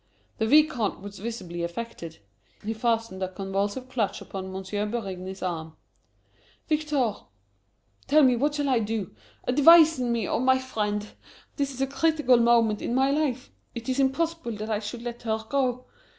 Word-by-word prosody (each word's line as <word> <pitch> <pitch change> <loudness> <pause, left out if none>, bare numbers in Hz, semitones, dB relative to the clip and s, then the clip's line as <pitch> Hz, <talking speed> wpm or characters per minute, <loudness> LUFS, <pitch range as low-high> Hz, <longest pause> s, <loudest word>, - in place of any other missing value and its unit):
The 220 - +1
Vicomte 270 -6 +3
was 205 -1 -9
visibly 190 -6 -5
affected. 170 -2 -6 0.5
He 220 +2 -2
fastened 225 -3 -1
a 185 - 0
convulsive 200 +6 -3
clutch 235 -6 -1
upon 190 -1 -7
M. 190 0 -6 0.3
Berigny's 190 -4 -5
arm. 160 -3 -4 0.9
"Victor, 295 -8 0 0.9
tell 305 +1 +5
me, 255 -2 +5
what 290 +5 0
shall 290 -1 0
I 255 -3 +3
do? 215 - -3 0.3
Advise 315 +3 +6
me, 235 -4 0
oh, - - 0
my 260 +1 +4
friend! 210 -5 -2 0.5
This 280 -1 0
is 265 0 -7
a - - +3
critical 280 -1 +3
moment 230 -2 +3
in 240 - -2
my 265 +1 +3
life! 280 -4 -1 0.2
It 235 +1 -6
is 260 +1 0
impossible 275 -1 0
that 215 +1 -5
I 210 - +1
should 220 +3 -6
let 240 -1 -6
her 220 -1 -2
go. 255 -1 0
235 Hz, 160 wpm, -26 LUFS, 205-265 Hz, 0.9 s, Advise